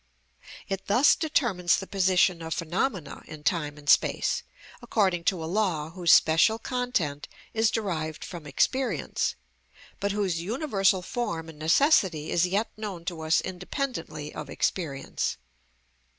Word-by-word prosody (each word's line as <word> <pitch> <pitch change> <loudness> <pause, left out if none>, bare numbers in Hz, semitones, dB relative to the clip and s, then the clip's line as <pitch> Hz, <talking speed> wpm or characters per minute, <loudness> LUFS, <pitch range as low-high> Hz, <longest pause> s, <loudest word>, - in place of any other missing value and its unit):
It 195 0 -4
thus 245 +8 +5
determines 230 - +1
the 195 - -5
position 185 -2 +2
of 160 0 -3
phenomena 175 - -2
in 155 -1 -10
time 150 -4 -1
and 145 0 -14
space, - - +3 0.4
according 195 -7 +1
to 180 -4 +1
a - - -3
law 165 -4 -1
whose 175 -1 +2
special 170 +6 +5
content 230 - -2 0.3
is 220 0 +3
derived 165 -9 -3
from 170 -4 -8
experience, 225 - 0 0.6
but 200 +1 0
whose 195 -5 -1
universal 195 - +1
form 170 -7 -3
and 155 -2 -12
necessity 165 - +3
is 175 +1 +3
yet 200 +5 -1
known 200 -6 -6
to 175 -3 -4
us 160 +1 +2
independently 180 - -5
of 150 - -7
experience. 140 -7 -2
180 Hz, 135 wpm, -27 LUFS, 160-210 Hz, 0.6 s, thus